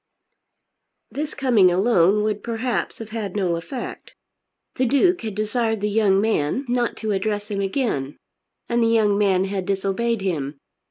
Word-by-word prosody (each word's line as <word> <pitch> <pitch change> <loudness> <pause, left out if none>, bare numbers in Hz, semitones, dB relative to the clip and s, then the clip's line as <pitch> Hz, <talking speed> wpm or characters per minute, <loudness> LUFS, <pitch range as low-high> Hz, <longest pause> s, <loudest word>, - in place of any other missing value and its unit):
This 300 +2 -4
coming 240 -9 +4
alone 195 +1 +3
would 210 -1 -1
perhaps 235 +1 -2
have 225 -2 -8
had 215 -4 -5
no 185 -4 +1
effect. 170 +10 -7 0.6
The 255 - +2
Duke 350 +8 +3
had 220 -4 -5
desired 220 +1 0
the 210 +1 -1
young 200 -2 +3
man 215 - 0
not 245 -1 0
to 220 -1 -2
address 205 +1 -2
him 200 -1 -1
again; 195 - -2 0.5
and 235 0 +1
the 230 - +3
young 220 -3 +3
man 195 -2 +2
had 195 -1 -3
disobeyed 200 +3 0
him. 150 -7 -2
210 Hz, 155 wpm, -22 LUFS, 195-235 Hz, 0.6 s, coming